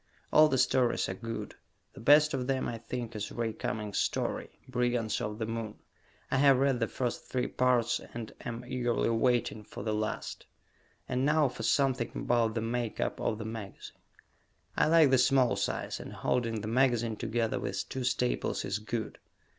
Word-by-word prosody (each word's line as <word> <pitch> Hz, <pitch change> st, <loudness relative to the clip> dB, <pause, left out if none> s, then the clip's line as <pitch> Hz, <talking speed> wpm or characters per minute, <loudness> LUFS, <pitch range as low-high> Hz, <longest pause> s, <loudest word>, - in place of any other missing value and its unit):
All 155 Hz, 0 st, +8 dB
the 135 Hz, -, +1 dB
stories 125 Hz, -6 st, +2 dB
are -, -, -2 dB
good. 115 Hz, +4 st, -6 dB, 0.4 s
The -, -, -12 dB
best 150 Hz, +4 st, +6 dB
of 130 Hz, -2 st, -2 dB
them, 135 Hz, -1 st, 0 dB
I 115 Hz, -1 st, -4 dB
think, 120 Hz, 0 st, -5 dB
is 105 Hz, -1 st, -4 dB
Ray 115 Hz, -2 st, -2 dB
Cummings' 105 Hz, -2 st, -3 dB
story, -, -, -1 dB, 0.2 s
"Brigands 120 Hz, -3 st, 0 dB
of 105 Hz, 0 st, -3 dB
the 110 Hz, -, -2 dB
Moon." 115 Hz, -1 st, -4 dB, 0.6 s
I -, -, +2 dB
have 135 Hz, -1 st, +6 dB
read 135 Hz, -2 st, +2 dB
the 115 Hz, -, +1 dB
first 125 Hz, 0 st, -3 dB
three 125 Hz, -1 st, -1 dB
parts 125 Hz, -2 st, +1 dB
and 115 Hz, -2 st, -6 dB
am 120 Hz, 0 st, -5 dB
eagerly 120 Hz, -2 st, 0 dB
waiting 115 Hz, -2 st, +1 dB
for 105 Hz, -, -8 dB
the 110 Hz, -1 st, -1 dB
last. 110 Hz, 0 st, -3 dB, 0.6 s
And 125 Hz, 0 st, 0 dB
now 150 Hz, 0 st, +3 dB
for 125 Hz, -, -8 dB
something 130 Hz, -5 st, +1 dB
about 115 Hz, -2 st, +1 dB
the 115 Hz, -, 0 dB
make 115 Hz, -1 st, -2 dB
up -, -, -1 dB
of 110 Hz, -, 0 dB
the 110 Hz, -, -6 dB
magazine. 110 Hz, -3 st, -8 dB, 0.8 s
I -, -, +3 dB
like 160 Hz, -3 st, +6 dB
the 130 Hz, -, +5 dB
small 130 Hz, -1 st, +4 dB
size, -, -, -2 dB
and -, -, -8 dB
holding 115 Hz, -3 st, -1 dB
the 105 Hz, -, -5 dB
magazine 120 Hz, -2 st, +2 dB
together 115 Hz, +1 st, -1 dB
with -, -, -3 dB
two 130 Hz, -, -4 dB
staples 125 Hz, 0 st, 0 dB
is 100 Hz, +1 st, -2 dB
good. 110 Hz, +1 st, -4 dB
120 Hz, 180 wpm, -30 LUFS, 110-130 Hz, 0.8 s, All